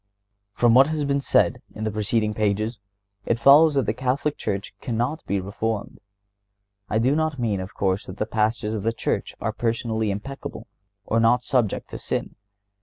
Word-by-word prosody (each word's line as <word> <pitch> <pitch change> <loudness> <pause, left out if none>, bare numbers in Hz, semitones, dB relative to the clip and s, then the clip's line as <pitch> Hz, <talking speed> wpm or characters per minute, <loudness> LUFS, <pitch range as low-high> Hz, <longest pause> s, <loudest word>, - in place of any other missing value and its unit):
From 120 -1 +4
what 135 +3 +7
has 155 -2 -1
been 140 0 +1
said - - +2
in 110 - -5
the 110 - -1
preceding 105 +1 0
pages, 110 +2 -1 0.4
it 115 - 0
follows 145 +5 +7
that 135 -4 +2
the 105 - 0
Catholic 130 +5 -1
Church 100 -1 -4
cannot 120 +6 -2
be 100 - 0
reformed. 105 +3 -3 0.9
I 110 - +1
do 130 +6 +3
not 155 -2 0
mean, 110 -5 0
of 95 +2 -7
course, 95 0 0
that 95 - -8
the 110 - -1
Pastors 110 0 0
of 110 - -2
the 115 +3 0
Church - - -2
are - - -2
personally 110 -2 -1
impeccable 105 +8 -6 0.4
or 115 - +1
not 120 +2 +4
subject 120 -6 0
to - - -6
sin. - - -3
115 Hz, 180 wpm, -24 LUFS, 105-130 Hz, 0.9 s, what